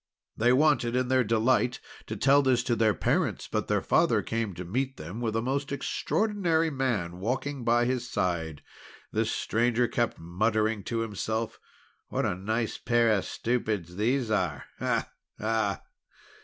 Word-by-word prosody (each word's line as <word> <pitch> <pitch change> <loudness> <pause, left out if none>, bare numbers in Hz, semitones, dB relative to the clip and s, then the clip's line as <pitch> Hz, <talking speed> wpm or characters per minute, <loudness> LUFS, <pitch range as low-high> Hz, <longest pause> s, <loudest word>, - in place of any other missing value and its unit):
They 120 +2 +3
wanted, 130 -4 +3
in 125 0 +1
their 130 -1 +4
delight, 115 +3 +2 0.3
to - - -4
tell 140 +1 +5
this 130 -3 +2
to 120 -2 +1
their 110 -2 +3
parents, - - 0
but - - -2
their - - +1
father - - +3
came 110 -4 -2
to 90 +1 -6
meet 130 +8 -2
them 85 +9 -7
with 110 -2 -1
a 115 - 0
most 140 +3 -1
extraordinary 170 +1 0
man 110 - -1
walking 130 +5 -2
by 120 +1 +3
his 125 -1 -1
side. 80 -7 -2 0.5
This 110 +1 0
stranger 120 +2 +1
kept 120 0 -1
muttering 110 +5 0
to 115 -1 -1
himself: 110 +1 -3 0.5
"What - - -1
a - - +1
nice 110 +5 -2
pair 120 -1 +3
of 100 -3 +1
stupids 110 -8 -2
these 115 +3 0
are! 90 -9 0 0.2
Ah! - - -1 0.3
Ah!" 110 -2 0
115 Hz, 155 wpm, -28 LUFS, 105-130 Hz, 0.5 s, tell